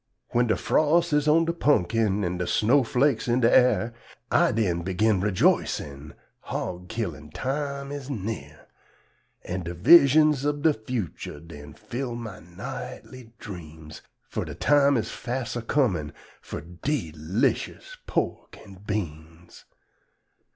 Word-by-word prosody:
When 120 0 +2
de 110 - +2
fros' 165 +2 +2
is 150 0 +2
on 165 +2 +5
de 170 - 0
pun'kin 110 - +2
an' 90 0 -2
de 90 - -2
sno' 130 +9 +3
flakes 125 0 +1
in 120 +1 +2
de 115 - +4
ar', 120 -3 +4 0.4
I - - +4
den 95 -6 0
begin 95 +3 +1
rejoicin' 75 -7 0 0.2
hog 90 0 -5
killin' 80 -10 -4
time 140 - -3
is 140 -1 -6
near; 110 -4 -5 0.8
An' 90 +1 -4
de 85 0 -6
vizhuns 150 - +6
ub 145 0 -1
de 160 - +5
fucher 110 - -5
den 75 -2 -12
fill 120 +3 -5
my 115 -5 -7
nightly 110 +7 -9
dreams, 80 -5 -10 0.3
Fur - - -3
de - - -7
time 140 -1 +4
is 110 -1 -2
fas' 125 0 -4
a 120 - -2
comin' 105 - 0 0.3
fur - - -7
de 90 - -3
'lishus 100 - -1
pork - - -2
an' 95 -3 -14
beans. 85 -5 -6
110 Hz, 135 wpm, -26 LUFS, 90-140 Hz, 0.8 s, vizhuns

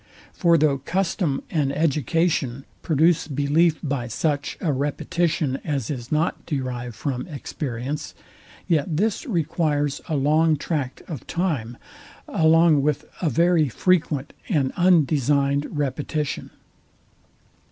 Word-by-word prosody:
For 170 -3 +4
though 145 -3 +2
custom 170 -1 -1
and 145 -5 +1
education 150 -3 0 0.2
produce 160 +2 +2
belief 150 +3 +2
by 135 -5 -2
such 145 +4 -1
a 155 -5 0
repetition, 145 +1 -1
as 140 -6 -2
is 125 -3 -6
not 155 +2 0
derived 125 -5 -3
from 130 0 -3
experience, 140 -3 -5 0.5
yet 155 -1 +1
this 220 - 0
requires 150 - 0
a 155 - 0
long 155 +3 +3
tract 140 -6 -3
of 150 -9 -7
time, 145 -10 -2 0.5
along 160 -2 +4
with 150 0 0 0.2
a 170 - +2
very 170 -2 +3
frequent 150 -1 +1 0.2
and 145 -9 +1
undesigned 145 -5 +3
repetition. 145 +1 -2
150 Hz, 110 wpm, -23 LUFS, 140-165 Hz, 0.5 s, For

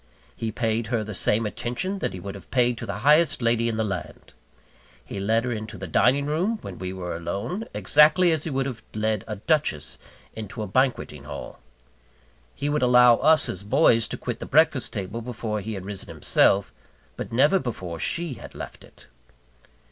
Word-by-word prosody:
He 115 -1 -3
paid 110 0 -1
her 115 -1 0
the 110 0 -6
same 105 +4 +1
attention 125 - -3
that - - -1
he 90 - -7
would 100 +2 -6
have 100 - -12
paid 125 -2 +2
to 115 - -6
the 100 0 -3
highest 155 +3 +5
lady 115 -1 +1
in 115 - -2
the 110 - +1
land. 100 -4 -6 0.7
He 100 - -6
led 110 +4 +1
her 125 - -2
into 110 -2 -5
the 95 - -6
dining 130 - +3
room, 175 +10 0
when - - -8
we 95 0 -4
were 90 -2 -5
alone, 100 - -4
exactly 155 +4 +5
as 160 -2 0
he - - -3
would 135 -2 -1
have 130 -4 -5
led 110 -2 0
a 110 - -4
duchess 125 - -1 0.4
into 110 +1 -6
a - - -4
banqueting 110 - 0
hall. 70 -1 -8 1.0
He 145 - -3
would 150 +1 0
allow 125 -1 +6
us, 155 +3 +4
as 95 - -3
boys, 115 +1 +3
to - - -5
quit 120 -1 -4
the - - -6
breakfast 145 -4 +3
table 100 +2 -4
before 110 -3 -4
he 110 +2 -5
had 95 -1 -7
risen 100 -1 -7
himself; 100 0 +2 0.4
but - - -6
never 145 +10 +4
before 90 - -5
she 170 - -2
had - - -11
left - - -8
it. - - -17
115 Hz, 195 wpm, -25 LUFS, 100-140 Hz, 1.0 s, allow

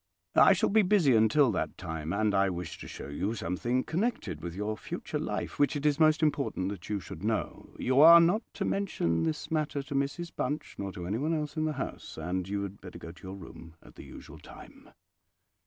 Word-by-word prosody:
I - - +7
shall - - +1
be 220 +1 +5
busy 180 - +4
until 115 +4 +4
that 95 - -3
time, 80 -3 -5
and 105 +2 +1
I 100 0 +3
wish 85 -2 -5
to - - -8
show - - -8
you 95 +10 -2
something 120 +7 -1
connected 160 - -2
with 85 0 -6
your 105 +2 -2
future - - -5
life - - -4
which 145 +1 +3
it 145 0 -3
is 150 0 +2
most 155 0 +4
important 140 -11 0
that 100 -3 -8
you 105 -1 -1
should 90 -1 -10
know. 110 +1 -3
You 130 +1 +1
are 170 +2 +10
not 175 +6 +3
to - - -2
mention 85 - 0
this 80 - -2
matter 150 -3 -1
to 145 - -7
Mrs 140 +5 -2
Bunch 150 +1 -3
nor 100 -1 -3
to 90 -3 -6
anyone 130 - -1
else 150 0 -3
in 155 -1 0
the 155 - -1
house; 135 - -6
and 90 +3 -3
you 100 0 -1
had 100 0 -7
better - - -9
go 85 - -9
to 85 - -18
your 95 - -6
room 85 -3 -12
at - - -16
the - - -11
usual - - -12
time." - - -14
110 Hz, 220 wpm, -29 LUFS, 90-150 Hz, -, are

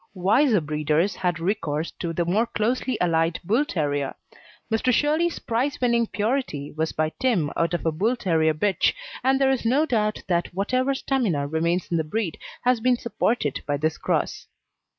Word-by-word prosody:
Wiser 215 +5 +3
breeders 155 +5 0
had 175 -2 -1
recourse 165 -4 -1
to 170 - -2
the 170 +1 -1
more 210 +7 +1
closely 240 +3 -1
allied 165 -1 +1
Bull 225 +11 +2
terrier; 145 - -2 0.6
Mr. 225 +3 +2
Shirley's 310 +7 +2
prize 250 +5 -1
winning 235 -2 +2
Purity 210 - -2
was 160 +1 -2
by 155 0 -1
Tim 205 - +2
out 170 +1 +1
of 175 - -4
a 160 - +2
Bull 210 +11 +1
terrier 160 -8 +1
bitch, 195 +5 +2 0.3
and 265 +1 +3
there 270 -1 +4
is 265 - -1
no 265 +7 +3
doubt 215 -6 0
that 175 -1 0
whatever 255 +7 +1
stamina 225 - 0
remains 170 +4 -1
in 170 - +2
the 160 - +1
breed 170 +2 -3 0.2
has 250 -1 +3
been 250 +2 +2
supported 230 - -1
by 145 -1 0
this 155 +2 -1
cross. - - -1
200 Hz, 170 wpm, -24 LUFS, 160-245 Hz, 0.6 s, there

